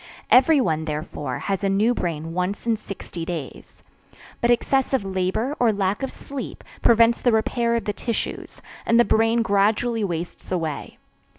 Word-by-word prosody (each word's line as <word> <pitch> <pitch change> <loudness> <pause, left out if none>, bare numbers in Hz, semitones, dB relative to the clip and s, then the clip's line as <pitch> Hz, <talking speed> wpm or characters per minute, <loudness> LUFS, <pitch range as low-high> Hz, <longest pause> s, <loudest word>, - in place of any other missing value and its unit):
Everyone, 250 - +4
therefore, 150 -1 -4
has 195 0 -3
a 195 - +2
new 210 +5 +3
brain 165 -6 -3
once 185 +5 -2
in 230 -1 +2
sixty 195 -5 -8
days. 165 -5 -7 0.6
But 235 - +2
excessive 265 0 +2
labor, 190 +8 -1
or 240 -2 +4
lack 200 +1 -1
of 270 - -3
sleep, 275 -1 -8 0.2
prevents 230 0 +4
the 245 - +3
repair 235 +1 +1
of 230 -3 -2
the 205 - -1
tissues, 230 +2 -4 0.2
and 230 +1 +3
the 240 - +6
brain 225 +1 +3
gradually 215 +3 +1
wastes 175 -2 -5
away. 160 -5 -3
210 Hz, 155 wpm, -23 LUFS, 180-235 Hz, 0.6 s, the